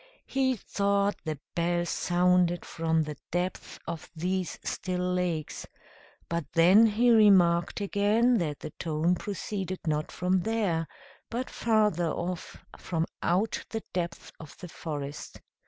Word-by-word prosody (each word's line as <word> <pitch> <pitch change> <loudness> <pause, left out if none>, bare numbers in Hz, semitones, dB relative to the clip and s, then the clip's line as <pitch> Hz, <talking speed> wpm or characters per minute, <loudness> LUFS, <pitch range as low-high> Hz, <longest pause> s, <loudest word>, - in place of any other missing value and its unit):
He 265 -1 +1
thought 200 -1 0
the 155 -2 -2 0.2
bell 175 0 0
sounded 175 0 +2
from 160 -1 0
the 150 -2 -6
depths 180 +1 -3
of 170 -1 -6
these 180 +2 -2
still 180 -1 -2
lakes; 175 -4 -2 0.6
but 170 0 -1
then 185 +7 +7
he 235 +3 +3
remarked 190 -6 +5
again 210 +4 +3
that 150 -5 -3
the - - -6
tone 160 +2 +1
proceeded 190 -1 -4
not 155 -1 -1
from 185 +1 +1
there, 190 -6 0 0.4
but 245 +2 -3
farther 210 -7 +2
off, 175 +2 -4 0.2
from 165 -2 -1 0.2
out 190 +6 0
the 225 -1 -4
depths 170 -1 -3
of 155 -3 -11
the 180 - -9
forest. 145 -3 -6
180 Hz, 130 wpm, -28 LUFS, 165-205 Hz, 0.6 s, then